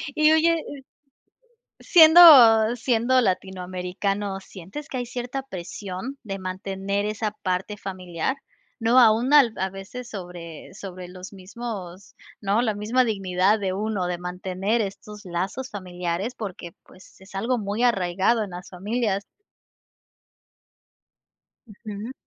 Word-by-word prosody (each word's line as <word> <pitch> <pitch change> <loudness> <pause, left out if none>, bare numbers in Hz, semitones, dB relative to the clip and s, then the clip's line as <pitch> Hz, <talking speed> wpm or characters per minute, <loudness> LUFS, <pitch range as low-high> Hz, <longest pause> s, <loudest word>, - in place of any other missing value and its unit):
Y 310 0 +5
oye 325 +1 +3 1.2
siendo 295 -10 +8
siendo 245 +1 +2
latinoamericano, 190 0 -2
¿sientes 195 - -10
que - - -6
hay 245 - -3
cierta 245 +2 -5
presión 195 +3 -7
de 195 -2 -5
mantener 195 +2 -3
esa 215 0 -2
parte 190 0 -3
familiar? 185 - -4 0.4
No 230 +3 +4
aún 235 +2 +5
al 275 -6 +6
a 190 +1 -1
veces 195 +6 -9
sobre 175 -4 -9
sobre 185 -2 -8
los 185 +2 -10
mismos 195 -2 -8 0.2
¿no?, 205 +3 +1
la 220 -3 0
misma 220 +5 +1
dignidad 195 -1 +1
de 190 -2 -1
uno, 205 -2 -2
de 175 0 -3
mantener 185 +5 -2
estos 210 +1 -6
lazos 190 +9 -4
familiares 180 +2 -4
porque, 185 -7 -7
pues, 185 0 -19
es 190 +1 -16
algo 235 +5 0
muy 205 +2 -3
arraigado 195 0 +2
en 205 - -5
las 180 +1 -9
familias. 200 +1 -2 2.4
Ujú. 215 +1 -8
200 Hz, 120 wpm, -24 LUFS, 185-235 Hz, 2.4 s, siendo